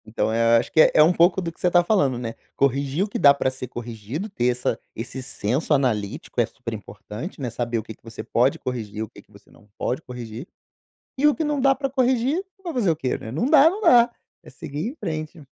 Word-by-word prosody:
Então 110 0 -1
eu 115 0 +4
acho - - -5
que 160 - +6
é - - +6
é 155 - +8
um 165 +3 +4
pouco 175 +2 +3
do 170 -2 -4
que - - -26
você - - +1
está 175 0 +4
falando, 145 - +2
né, 115 -2 -4 0.2
corrigir 140 +4 +1
o - - -2
que 205 - -4
dá 140 -1 +7
pra 140 -2 0
ser 130 -1 -7
corrigido, 120 - -6
ter 125 -11 -1
essa 125 0 0 0.2
esse 120 +3 -6
senso 130 +4 -1
analítico, 115 -8 0
é - - +2
super - - -8
importante, 135 - -8
né, 130 -3 -3
saber 120 0 -2
o 110 - -3
que 110 - -9
que - - -28
você 115 0 -8
pode 125 +4 +2
corrigir, 110 -4 -4
o 110 - -8
que - - -15
que - - -32
você 100 0 -19
não 105 - -21
pode 130 - -2
corrigir. 125 +1 -8 0.7
E 290 +3 +4
o 295 - +4
que 320 - -2
não 295 -2 -1
dá 270 0 +4
pra 275 0 -2
corrigir 260 +5 +1 0.2
vai 345 -3 -4
fazer 230 -8 +1
o 165 - +2
quê, 135 -5 -2
né? 110 - -8
Não 155 - -1
dá, 290 +2 +7
não 400 +5 -5
dá, 240 - +6 0.3
é - - -14
seguir 155 +2 -5
em 260 - -6
frente. 155 - -5
140 Hz, 245 wpm, -23 LUFS, 120-200 Hz, 0.7 s, é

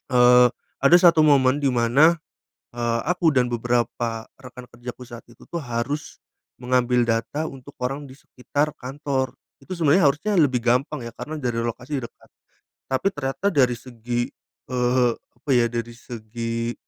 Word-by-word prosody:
Eee, 125 0 +6 0.3
ada 150 +6 +7
satu 170 -3 +6
momen, 135 -1 +4
di - - +2
mana, 135 +8 +4 0.6
eee, 115 -1 0
aku 180 -2 +2
dan 125 -1 +3
beberapa 120 -1 -1 0.2
rekan 125 -1 -11
kerjaku 120 +1 -9
saat 120 -1 -10
itu - - -18
tuh, 170 - -4
harus, 125 +6 -4 0.4
mengambil 125 -1 +2
data 115 +7 -1
untuk 135 +1 -13
orang 135 +3 -2
di 130 - -12
sekitar 145 +3 -3
kantor. 135 0 -3 0.3
Itu 185 - -7
sebenarnya 165 0 +4
harusnya 155 +10 -1
lebih 130 -6 +3
gampang 125 +3 +1
ya, 115 - -6
karena 155 +6 -7
dari 120 -3 -2
lokasi 125 +4 -4
dekat. 120 - -12 0.6
Tapi 130 +8 -1
ternyata 145 +6 -3
dari 130 -3 +4
segi, 120 0 -4 0.4
eee, 125 -1 +2
apa - - -12
ya, 120 -1 +4
dari 120 0 -4
segi, 115 -1 -5
125 Hz, 150 wpm, -23 LUFS, 120-145 Hz, 0.6 s, ada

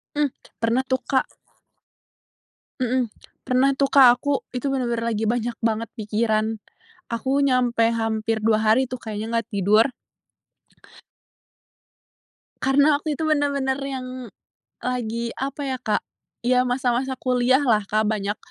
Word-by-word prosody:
Mmm, 295 -1 +2 0.3
pernah 230 +3 +2
tuh 260 0 0
Kak. 265 -2 +1 1.5
Mhm, 250 -1 +1 0.3
pernah 260 +2 +2
tuh 275 0 +1
Kak, 270 -2 +8
aku 285 -1 -1
itu 255 +2 -2
benar-benar 235 -3 -1
lagi 220 +1 -1
banyak 235 +1 -1
banget 225 -1 -1
pikiran. 215 0 0 0.5
Aku 260 +5 0
nyampe 250 -3 +2
hampir 225 -1 -1
2 215 0 +3
hari 235 +4 +3
tuh, 255 - -4
kayaknya 215 -1 -5
nggak 230 -2 -1
tidur. 210 +4 +4 2.7
Karena, 285 +2 +4
waktu 305 +1 -3
itu 320 - -4
benar-benar 280 -3 +1
yang 255 -2 -6 0.5
lagi, 235 -2 -3
apa 275 +2 -4
ya 260 -1 -2
Kak, 215 -4 0 0.4
ya 250 0 +4
masa-masa 255 +1 -1
kuliahlah 250 -2 +2
Kak, 215 +1 +2
banyak 210 -1 -1
245 Hz, 125 wpm, -23 LUFS, 225-265 Hz, 2.7 s, Kak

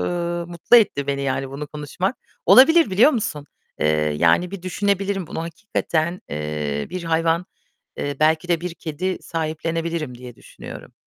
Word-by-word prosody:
ııı, 175 -1 -2
mutlu 175 +7 +4
etti 145 -11 +3
beni 140 0 -1
yani 135 0 -2
bunu 145 +2 -6
konuşmak. 155 - -3 0.3
Olabilir, 320 +2 +7
biliyor 210 +10 +6
musun? 150 - -3 0.3
Eee, - - +2 0.3
yani 85 - +3
bir 200 -2 -7
düşünebilirim 195 0 -1
bunu 160 - -5
hakikaten, 170 -1 -2
eee, 75 -1 -3
bir 185 -1 -5
hayvan, 165 +2 +1 0.5
eee, 145 -1 -3
belki 160 +3 +3
de 170 -2 +2
bir 175 -1 -5
kedi 175 +4 -3
sahiplenebilirim 165 -3 -3
diye 125 -1 -10
düşünüyorum. - - -11
165 Hz, 145 wpm, -22 LUFS, 145-185 Hz, 0.5 s, Olabilir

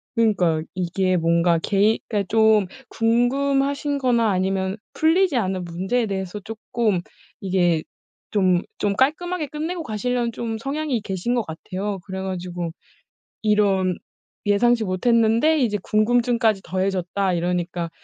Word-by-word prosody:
그러니까요. 180 -8 +2
이게 185 +1 0
뭔가 170 +1 +3
개인 205 +2 +3
그니까 205 -3 -1
좀 220 -3 +4 0.2
궁금하신 275 +5 +1
거나 235 -4 +2
아니면 190 +1 -1 0.2
풀리지 325 -2 +3
않은 190 -4 -1
문제에 190 +8 -1
대해서 190 0 -4
쪼끔 215 -2 -2 0.4
이게 175 -4 +1 0.5
좀, 185 -4 +3 0.2
좀 200 -1 0
깔끔하게 315 +5 0
끝내고 320 +4 -4
가시려는 240 +1 -1
좀 225 -1 -4
성향이 275 -1 -2
계신 200 +5 -2
것 235 - +1
같아요. 190 +5 -5
그래 190 -1 -5
가지고 180 -2 -4 0.7
이런 200 -4 +2 0.5
예상치 230 +3 +3
못했는데 230 +9 +3
이제 220 -6 +1
궁금증까지 230 -1 +2
더해졌다 185 +1 -1
이러니까 175 -1 -2
210 Hz, 305 characters per minute, -22 LUFS, 185-240 Hz, 0.7 s, 좀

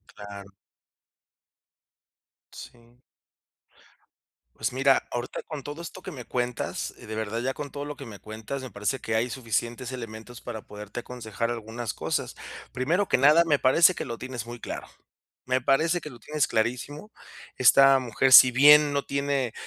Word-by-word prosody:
Claro. 100 -1 -10 2.0
Sí. 120 0 -14 1.6
Pues - - -3
mira, 135 +1 +3
ahorita 120 0 -4
con 155 -3 -7
todo 145 +5 -7
esto 185 - -9
que 185 - -8
me 130 -7 -9
cuentas 125 -1 -3
y - - -13
de 110 - -6
verdad, 110 +1 -3
ya 130 +2 -1
con 145 0 -7
todo 145 +1 -6
lo 145 0 -6
que 140 -1 -10
me 105 -3 -10
cuentas, 110 +5 -7
me 130 - -8
parece 105 +6 -2
que 110 - -4
hay 115 +3 +1
suficientes 120 +1 -3
elementos 115 -1 -8
para 115 -3 -7
poderte 105 +3 -8
aconsejar 115 -1 -4
algunas 115 0 -5
cosas. - - -3 0.4
Primero 165 +11 0
que - - +2
nada, 150 +5 +6
me 150 -4 +2
parece 165 +8 +5
que - - -5
lo 115 -2 -6
tienes 125 -3 -6
muy 120 0 -8
claro. - - -6 0.6
Me 130 0 0
parece 160 +7 +2
que 155 - -8
lo 120 -4 -13
tienes 150 +4 -1
clarísimo. 125 - -2 0.4
Esta 135 +1 +6
mujer, 130 +1 +1
si 130 0 +10
bien 145 +3 +7
no 140 -1 0
tiene 140 -4 -1
125 Hz, 165 wpm, -26 LUFS, 115-140 Hz, 2.0 s, si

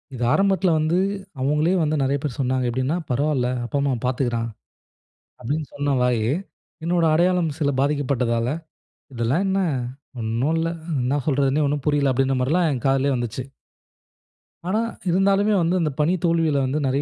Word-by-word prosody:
இது 125 - -3
ஆரம்பத்துல 195 -2 +2
வந்து 155 +3 +1 0.4
அவுங்களே 150 +6 +2
வந்து 155 0 0
நிறைய 135 +1 +1
பேர் 140 -6 -3
சொன்னாங்க 130 -1 0
எப்படின்னா 130 +5 -1
"பரவாயில்லை, 130 -1 +1
அப்பா, 130 - -2
அம்மா 140 -1 +1
பார்த்துக்குறான்." 120 -2 0 0.9
அப்படின்னு 145 +6 -2
சொன்ன 145 0 0
வாய். 125 -3 +2 0.6
என்னுடைய 170 -1 +2
அடையாளம் 175 0 +2
சில 145 -2 +1
பாதிக்கப்பட்டதால, 130 -5 0 0.7
"இதெல்லாம் 125 +10 0
என்ன 190 0 +1 0.6
ஒண்ணும் 115 +8 0
இல்ல? 165 0 0 0.3
என்ன 130 +4 0
சொல்றதுனே 140 +1 +2
ஒண்ணும் 145 -1 -2
புரியல?" 145 -2 +2
அப்படின்ற 135 +1 +1
மாதிரிலாம் 160 +6 +2
என் 130 -3 -4
காதிலேயே 135 0 +2
வந்துச்சு. 120 +1 -3 1.2
ஆனா 205 +4 +1 0.3
இருந்தாலுமே 195 +3 +3
வந்து 170 +2 +1
அந்த 155 -2 0
பணி 150 +4 +3
தோல்வியில 165 -3 +2
வந்து 135 +4 -1
நிறைய 135 +2 +1
140 Hz, 145 wpm, -23 LUFS, 130-165 Hz, 1.2 s, இருந்தாலுமே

